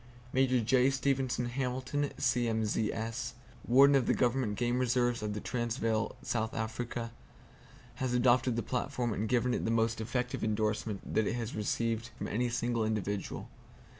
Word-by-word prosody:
Major 130 -1 +3
J. 125 +3 +4
Stevenson 135 -2 0
Hamilton, 130 +3 -2
C.M.Z.S., 115 -2 0 0.3
Warden 140 +3 +6
of 135 -3 +2
the - - +3
Government 120 -4 +1
Game 120 +1 +1
Reserves 120 -1 +1
of 105 -1 -3
the - - -2
Transvaal, 115 -1 -1
South 115 -1 -1
Africa, 115 +1 -3 0.9
has 130 -1 -1
adopted 125 0 +3
the 115 - -1
platform 125 0 -1
and 105 +1 -2
given 125 0 +2
it - - -1
the - - 0
most 115 0 +1
effective 125 +2 -2
endorsement 105 -1 -1
that 110 -2 +2
it - - 0
has 115 -1 -3
received 115 +2 -1
from - - -4
any 120 +3 0
single 120 -1 0
individual. 105 -2 -2
120 Hz, 150 wpm, -32 LUFS, 110-125 Hz, 0.9 s, Warden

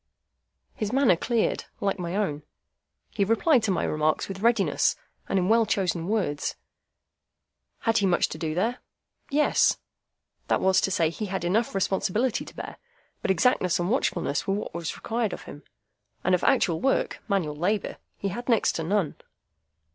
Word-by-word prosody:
His 215 -1 -3
manner 265 -7 +4
cleared, 230 +6 0
like 200 -1 -1
my 175 +1 -3
own. 185 -8 -1 0.7
He 200 - +1
replied 230 - +3
to 220 - -1
my 185 - +1
remarks 155 0 0
with 195 -1 -6
readiness, 230 +3 +2 0.3
and 195 - +1
in 180 -1 +1
well 225 +1 +4
chosen 180 -3 0
words. 195 -9 -1 1.3
Had 225 -1 +2
he 200 - +2
much 175 -2 +3
to - - -7
do 155 -1 -2
there? 230 +8 0 0.5
Yes; 295 +1 +3 0.7
that - - +2
was 190 0 +3
to - - +1
say, 165 -4 +1
he 210 +5 -4
had 190 -2 -3
enough 210 +5 +1
responsibility 200 +5 0
to - - -12
bear; - - -7 0.4
but - - -2
exactness 190 -2 +3
and 175 +3 -1
watchfulness 255 - 0
were 195 - +1
what 205 - -5
was 170 -1 -4
required 225 -3 -2
of - - -7
him, 145 - -10 0.6
and 185 - +2
of 180 - +2
actual 185 -11 +2
work—manual 195 - 0
labour—he 200 +3 -3
had 240 +7 -6
next 230 -3 +3
to 165 - -2
none. 185 -2 0
195 Hz, 160 wpm, -26 LUFS, 175-225 Hz, 1.3 s, manner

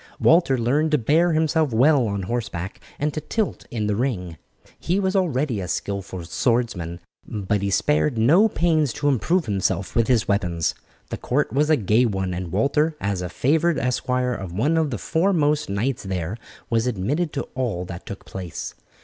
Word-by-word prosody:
Walter 165 -5 +4
learned 140 +7 +1
to - - +6
bear 160 +8 +3
himself 155 -2 +2
well 130 +2 +4
on 100 -2 -2
horseback 95 -4 -4 0.2
and 150 0 -1
to 155 - -3
tilt 215 +7 -2
in 110 -3 -2
the 105 -1 0
ring. 95 - -2 0.4
He 180 +4 0
was 190 0 0
already 145 - +1
a 90 - -4
skilful 95 -1 -4
swordsman, 90 -3 -1 0.3
but 105 -1 -1
he 100 - 0
spared 150 +4 +1
no 165 - +5
pains 160 - +1
to 145 - -2
improve 160 - +1
himself 100 -1 -1
with 115 -1 +3
his 120 -4 +2
weapons. 90 -5 0 0.4
The - - -2
court 145 +4 -1
was 150 +3 +2
a 155 - +5
gay 110 +4 +3
one, 95 -3 -2
and 90 -1 -5
Walter, 150 +10 +1
as 100 -2 -2
a 90 - -4
favoured 160 - +1
esquire 125 0 0
of 95 -6 -6
one 120 - +1
of 160 -2 +2
the 120 - -3
foremost 150 - +1
knights 110 +6 -1
there, 95 -1 -3 0.3
was 115 +1 +1
admitted 135 - -1
to 140 - -2
all 115 -9 -2
that 85 0 -9
took 100 - -8
place. 90 -4 -6
120 Hz, 180 wpm, -23 LUFS, 100-150 Hz, 0.4 s, to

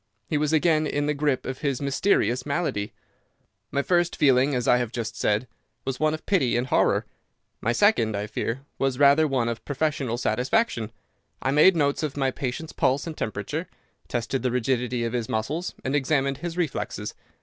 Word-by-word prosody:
He 155 - -1
was 150 0 +1
again 155 -1 +3
in 145 0 -1
the 150 - +1
grip 145 -2 0
of 130 0 -4
his 140 -4 -1
mysterious 135 - +1
malady. 140 -9 -2 0.8
"My 140 - 0
first 175 0 +2
feeling, 135 0 +3
as 125 -1 -1
I 125 - +6
have 120 -3 -2
just 115 -2 -4
said, 105 +2 0 0.4
was 130 -1 -3
one 155 0 +2
of 155 - -12
pity 135 - +2
and 120 - 0
horror. - - +2 0.6
My 115 - +1
second, 120 - +3
I 100 - -2
fear, 115 +4 -3 0.2
was 135 -2 0
rather 145 +3 +5
one 130 -4 0
of 115 -1 -3
professional 140 -4 -1
satisfaction. 120 - 0 0.5
I 135 - 0
made 155 +6 +6
notes 140 -3 +1
of 150 -2 -3
my 135 -1 +1
patient's 135 +5 -4
pulse 135 +2 +1
and 165 -2 -5
temperature, 145 - -3 0.4
tested 120 +2 -2
the 130 - +1
rigidity 125 0 0
of 115 0 -2
his 120 -3 -2
muscles, 150 +12 -2
and 135 +2 -1
examined 140 -1 +1
his 170 +2 -5
reflexes. 130 -10 -2
135 Hz, 180 wpm, -25 LUFS, 120-150 Hz, 0.8 s, I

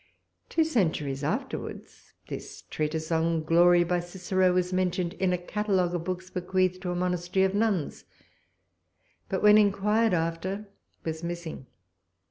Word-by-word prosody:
Two 325 - +3
centuries 160 - 0
afterwards, 150 - -5
this - - -8
treatise 155 +1 -2
on 165 0 +1
Glory 175 +2 +5
by 175 +1 0
Cicero 185 +1 0
was 180 0 0
mentioned 180 -1 0
in 190 -1 0
a 180 - +1
catalogue 185 -1 0
of 170 -1 -3
books 185 0 -4
bequeathed 185 0 0
to 185 - -3
a 175 - -1
monastery 180 +1 +1
of 190 - 0
nuns, 205 -7 0 1.2
but 190 - -2
when 210 0 +8
inquired 210 +1 +3
after 175 +5 -2 0.4
was 160 0 -4
missing. 170 -5 -5
180 Hz, 135 wpm, -27 LUFS, 170-190 Hz, 1.2 s, when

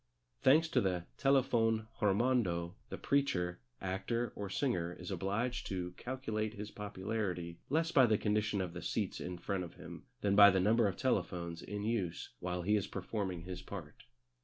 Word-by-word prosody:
Thanks 155 +5 +6
to - - +3
the 90 -3 0
Telefon 120 -5 +3
Hirmondo 100 -5 +2 0.2
the - - -5
preacher, 90 - +1 0.2
actor, 110 +5 -2
or 100 -1 -4
singer 90 -8 0
is 90 +3 -7
obliged 100 +7 -1
to 90 -2 -3
calculate 110 -1 -3
his 105 0 -6
popularity 95 -4 -3
less 165 +4 +1
by 130 -5 +6
the 110 -2 +3
condition 105 -1 +1
of 90 -2 -4
the 90 - -6
seats 105 -4 -2
in 90 0 -4
front 95 +1 -2
of 85 - -9
him - - -10 0.2
than 100 -1 +2
by 100 0 +10
the 95 -1 +3
number 110 +4 +4
of 95 - -3
telephones 85 -8 -1
in 105 0 -5
use 105 -6 -2
while 90 0 -3
he 105 +4 +3
is 100 -2 0
performing 95 -3 -3
his 90 0 -6
part. - - -9
100 Hz, 170 wpm, -34 LUFS, 90-115 Hz, 0.2 s, by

